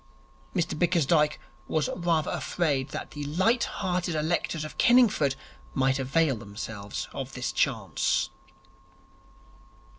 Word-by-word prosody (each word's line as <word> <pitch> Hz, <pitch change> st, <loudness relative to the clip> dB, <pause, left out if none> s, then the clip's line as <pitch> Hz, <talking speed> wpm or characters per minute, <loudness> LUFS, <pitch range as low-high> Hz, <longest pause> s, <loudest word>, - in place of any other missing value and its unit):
Mr 175 Hz, -3 st, 0 dB
Bickersdyke 160 Hz, -2 st, +2 dB, 0.3 s
was 155 Hz, -2 st, +1 dB
rather 170 Hz, -3 st, +1 dB
afraid 145 Hz, -6 st, 0 dB
that -, -, -6 dB
the 145 Hz, -, -6 dB
light 190 Hz, -, +2 dB
hearted 180 Hz, -3 st, -2 dB
electors 155 Hz, 0 st, -1 dB
of 155 Hz, -, -10 dB
Kenningford 225 Hz, -, +5 dB, 0.4 s
might 135 Hz, 0 st, +2 dB
avail 135 Hz, +1 st, +2 dB
themselves 105 Hz, -1 st, -6 dB
of -, -, -5 dB
this -, -, -2 dB
chance. -, -, +1 dB
155 Hz, 110 wpm, -27 LUFS, 135-175 Hz, 0.4 s, Kenningford